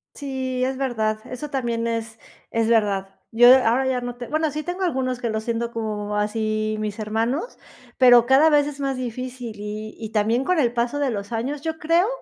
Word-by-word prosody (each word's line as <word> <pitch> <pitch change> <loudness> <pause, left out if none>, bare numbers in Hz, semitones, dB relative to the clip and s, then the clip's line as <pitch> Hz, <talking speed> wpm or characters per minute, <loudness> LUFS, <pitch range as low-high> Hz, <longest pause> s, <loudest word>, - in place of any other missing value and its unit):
Sí, 260 -3 -3
es 260 +1 -1
verdad, 220 -5 -1
eso 255 +4 -6
también 235 -4 -2
es 225 -1 -3 0.3
es 230 -1 +1
verdad. 200 -4 +1 0.2
Yo 240 +2 +7 0.2
ahora 245 +4 +2
ya 255 -1 0
no 245 0 -5
te 245 -1 -7
bueno, 310 +1 0
sí 305 +2 -4
tengo 355 +3 -5
algunos 260 -7 -1
que 240 - -2
los 220 0 -2
siento 235 0 -2
como, 210 -2 -3
así, 215 0 -1
mis 210 0 -3
hermanos, 230 - -2 0.4
pero 245 -2 +7
cada 270 +5 +5
vez 290 -1 +4
es 290 -1 -7
más 275 -2 -1
difícil 250 -1 -5
y 210 +1 -6
y 220 - -5
también 225 +4 +1
con 360 +3 +1
el 240 -4 +2
paso 240 +4 -1
de 275 -3 +1
los 200 0 -5
años, 265 +6 -3
yo 320 0 -3
creo 335 +4 +2
240 Hz, 200 wpm, -23 LUFS, 220-270 Hz, 0.4 s, Yo